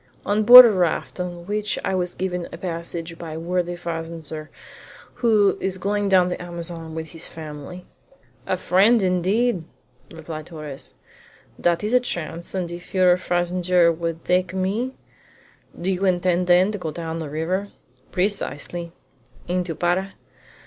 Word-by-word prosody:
"On 205 +1 +1
board 245 +3 +12
a 230 - +5
raft, 180 -2 -1
on 175 -1 -5
which 210 +1 -1
I - - 0
was 180 -1 -1
given 180 -2 -3
a - - -7
passage 170 -1 -6
by 165 -2 -6
a 160 - -5
worthy 175 +1 -1
fazender 165 -2 -6 0.7
who 215 -4 +4
is 190 -1 -2
going 200 +1 -1
down 185 -2 +5
the 180 - -4
Amazon 170 -2 -7
with 160 0 -5
his 165 0 -6
family." 155 +3 -9 0.6
"A 185 - 0
friend 200 +5 +4
indeed!" 185 +3 +1 0.5
replied 160 -1 -8
Torres. 150 -5 -7 0.6
"That 170 +2 +1
is 215 +3 -1
a 250 - +6
chance, 170 -7 -5
and 180 -2 -2
if 175 +2 -9
your 180 -1 +5
fazender 175 -1 +2
would 165 0 -4
take 180 0 +1
me 210 +8 -2 0.4
" - - -24
"Do 185 +2 -1
you 190 +1 -2
intend, 180 -1 +1
then, 180 +3 +5
to 205 - -5
go 165 - -4
down 165 +1 -5
the 160 -3 -5
river?" 175 +7 -2 0.4
"Precisely." 175 -3 -2 0.5
"Into 180 -2 -1
Para?" 180 +4 0
180 Hz, 155 wpm, -23 LUFS, 165-190 Hz, 0.7 s, board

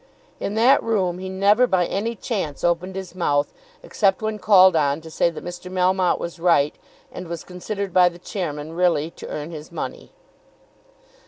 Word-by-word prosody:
In 205 - -3
that 250 +5 +5
room 185 -6 0
he 190 0 -6
never 200 +6 +3
by 185 -4 +2
any 225 +6 -2
chance 190 - -4
opened 175 +2 0
his 190 -2 -6
mouth, 145 -5 0 0.3
except 195 0 +1
when 215 -1 -2
called 190 -4 +6
on 145 -1 +2
to 160 0 -11
say 170 - +2
that 165 - -9
Mr. 175 +1 -8
Melmotte 185 0 +2
was 170 0 -6
right, 165 -4 +3 0.4
and 180 - -8
was 170 0 -6
considered 195 +1 -5
by 180 -1 +6
the 170 - -13
chairman 160 -4 -5
really 170 -3 +1
to - - -10
earn 150 +2 -6
his 155 -1 -9
money. - - -6
180 Hz, 175 wpm, -22 LUFS, 165-195 Hz, 0.4 s, called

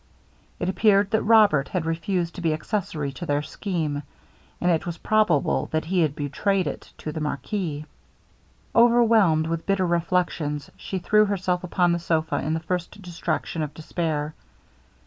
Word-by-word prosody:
It 175 - -2
appeared 200 0 +3
that 220 - +2
Robert 210 -11 +5
had 180 -4 -2
refused 170 +1 -1
to 180 - -7
be 165 -2 +1
accessary 155 -4 -3
to 135 - -9
their 145 0 +1
scheme; 155 -3 -3 0.6
and 180 - +2
it 165 - +1
was 170 -1 -4
probable 210 -9 +2
that 155 0 0
he 180 +2 0
had 150 -3 +1
betrayed 185 +7 0
it - - -6
to 155 - -5
the 155 - -5
marquis. 150 - -3 0.9
Overwhelmed 230 -9 +5
with 165 0 -3
bitter 195 -2 +2
reflections, 170 -4 -1
she 190 - -5
threw 210 +4 +4
herself 185 -3 -1
upon 180 0 +2
the 170 - 0
sopha 165 -1 0
in 155 +1 -1
the - - -1
first 180 +4 -4
distraction 170 -3 -3
of 150 -1 -4
despair. 155 -2 -2
170 Hz, 160 wpm, -24 LUFS, 155-195 Hz, 0.9 s, Robert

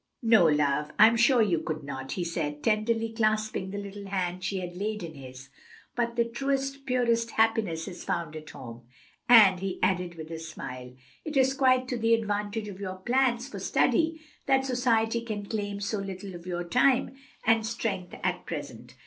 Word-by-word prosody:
"No, 220 -7 +6
love, 150 -1 +1
I'm 220 +2 +7
sure 235 +1 +5
you 175 -6 +1
could 155 -1 -4
not," 135 -1 -5
he 180 - -2
said, 150 -3 -3
tenderly 225 +1 +1
clasping 215 -3 0
the 200 - -5
little 200 0 -7
hand 185 -2 -2
she 190 +1 -2
had 175 -1 -6
laid 210 +1 -3
in 165 -1 -7
his. 130 -1 -11 0.5
"But 235 -1 -1
the 235 -1 +2
truest, 275 +3 -2
purest 235 -2 +1
happiness 220 -8 +1
is 180 -3 -8
found 160 -2 -3
at 155 -1 -8
home. 120 -2 -10 0.4
And," 205 -6 +8
he 195 0 -3
added 180 -2 0
with 160 0 -9
a 165 - -5
smile, 125 -6 -8 0.3
"it 305 -2 -3
is 265 0 +4
quite 255 -1 +3
to 245 - -2
the 230 0 +4
advantage 210 0 -2
of 195 -2 -8
your 190 -2 -4
plans 245 +4 +1
for 280 - -7
study 320 -1 +1 0.3
that 265 -1 +3
society 235 -3 +1
can 215 -3 -5
claim 205 -1 -3
so 200 +1 -2
little 195 0 -6
of 175 0 -10
your 175 -1 -2
time 250 +8 +2 0.3
and 225 -1 +4
strength 215 -5 -3
at - - -2
present. - - -7
205 Hz, 185 wpm, -28 LUFS, 175-235 Hz, 0.5 s, And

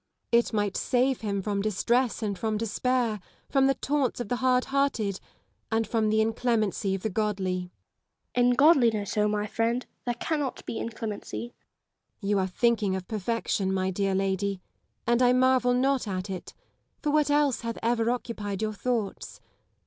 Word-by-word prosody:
Elizabeth 235 0 +3
Gaunt. - - -25
It - - 0
might 205 -2 0
save 255 +1 +1
him 200 -2 -1
from 200 -1 -1
distress 235 +4 +1
and 200 -3 -2
from 220 -1 -1
despair, 230 +1 0 0.3
from 270 -1 +4
the 270 - +2
taunts 280 -3 0
of 240 - -4
the 245 - 0
hard 255 0 +2
hearted, 270 -8 0 0.5
and 225 0 +2
from 220 -2 +1
the 220 +1 +3
inclemency 220 -3 0
of 195 - -7
the 220 - 0
godly. 200 -2 0
Lady 180 - -1 0.8
Lisle. - - +5
In - - +5
godliness, 240 - +4
my 210 0 +1
friend! 230 +3 -1 0.2
there 240 -1 -1
cannot 290 +1 -2
be 225 - -4
inclemency. 230 +1 -5
Elizabeth - - -50
Gaunt. 200 - -3
You 205 - +3
are 190 - +1
thinking 210 0 +1
of 185 -1 -5
perfection, 215 -2 -1
my 190 0 0
dear 195 +1 0
lady; 195 0 0 0.5
and 235 +1 +2
I 250 0 +5
marvel 255 -1 +3
not 265 -1 +1
at 190 0 -3
it, 185 - -7 0.5
for 300 - +1
what 300 -1 +3
else 290 -3 +2
hath 230 -1 -4
ever 230 0 +2
occupied 220 -4 -3
your 215 0 -1
thoughts 225 -2 -3
225 Hz, 180 wpm, -27 LUFS, 205-250 Hz, 0.8 s, Lisle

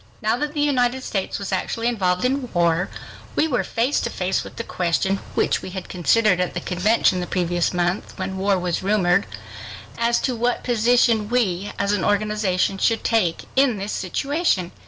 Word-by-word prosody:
Now 220 0 +1
that 295 +3 -3
the 295 - 0
United 260 -3 +1
States 195 -6 -2
was 200 -1 -5
actually 230 +4 -2
involved 185 -4 0
in 260 -1 -1
war, 170 +1 +2 0.5
we 315 - +2
were 250 -6 0
face 245 +5 0
to - - -2
face 185 +1 -1
with - - -11
the 230 - -4
question, 185 0 0 0.2
which - - +1
we - - -7
had 185 0 -7
considered 185 +2 +2
at 180 - -2
the - - -1
convention 185 +1 +2
the 180 - -3
previous 175 -1 0
month, 175 +1 -2
when 190 -1 -4
war 195 0 +2
was 175 -2 -2
rumored, 190 -1 +2 0.7
as 235 0 +2
to 255 - -1
what 240 +1 -1
position 235 -2 +2
we, 205 -6 0
as 200 0 0
an 205 -2 0
organization, 205 -2 0
should 225 +2 +1
take 200 -8 +1
in 265 -4 +3
this 200 +2 -4
situation. 205 - -1
205 Hz, 180 wpm, -22 LUFS, 180-235 Hz, 0.7 s, in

